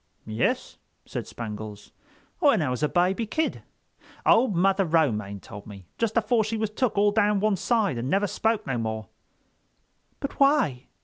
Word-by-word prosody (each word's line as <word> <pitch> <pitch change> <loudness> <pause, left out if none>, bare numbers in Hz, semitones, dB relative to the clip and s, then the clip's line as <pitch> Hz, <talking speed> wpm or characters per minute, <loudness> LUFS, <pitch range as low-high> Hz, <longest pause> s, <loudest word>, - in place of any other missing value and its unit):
"Yus," 110 +1 -1 0.3
said - - -5
Spangles, 105 -2 -7 0.5
"when 280 - +4
I 130 - -1
was 125 - -3
a 150 - +2
baby 190 +5 +1
kid. 315 +8 -1 0.6
Old 230 -4 +4
Mother 195 +3 +3
Romaine 115 - +1
told 100 +1 -11
me, 100 -3 -11
just 230 0 0
afore 230 0 +3
she 220 +1 -2
was 215 -1 -1
took 225 -1 -1
all 205 0 +4
down 205 -1 +2
one 210 0 +2
side 195 - +1
and 125 +3 -3
never 195 +6 +2
spoke 220 +2 0
no 125 -3 -2
more." 110 -2 -4 1.1
"But 275 - -5
why?" 275 - +3
190 Hz, 165 wpm, -26 LUFS, -, 1.1 s, when